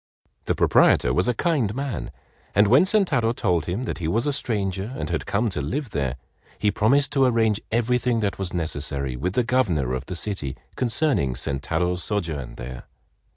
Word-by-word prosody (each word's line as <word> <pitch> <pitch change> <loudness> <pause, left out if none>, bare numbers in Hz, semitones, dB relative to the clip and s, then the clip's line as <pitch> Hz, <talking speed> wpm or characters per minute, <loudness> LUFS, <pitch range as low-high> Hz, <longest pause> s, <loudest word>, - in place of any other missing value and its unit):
The - - 0
proprietor - - +4
was 90 +5 +2
a 125 - +2
kind 130 - 0
man, 135 -4 -3 0.5
and 105 +2 +6
when 130 - +5
Sentaro 160 - +2
told 85 -8 0
him 95 +8 -2
that - - -4
he 80 - -2
was 115 - +1
a 145 - +1
stranger 100 -5 -1
and 75 +2 -4
had 85 - -2
come 110 +4 +1
to 85 -7 -3
live 125 - -3
there, 70 -6 -1 0.4
he 105 - +1
promised 135 +8 +2
to 135 -2 +3
arrange 110 -4 +2
everything 120 +1 +1
that 100 -2 -1
was 95 -2 -2
necessary 70 -6 -3
with 90 +9 -2
the 125 - +2
governor 90 - +1
of 65 +1 -4
the 90 - -4
city 80 -7 -3 0.2
concerning 125 - +1
Sentaro's 75 +7 -1
sojourn 80 - -3
there. 60 0 -8
100 Hz, 180 wpm, -24 LUFS, 75-125 Hz, 0.5 s, and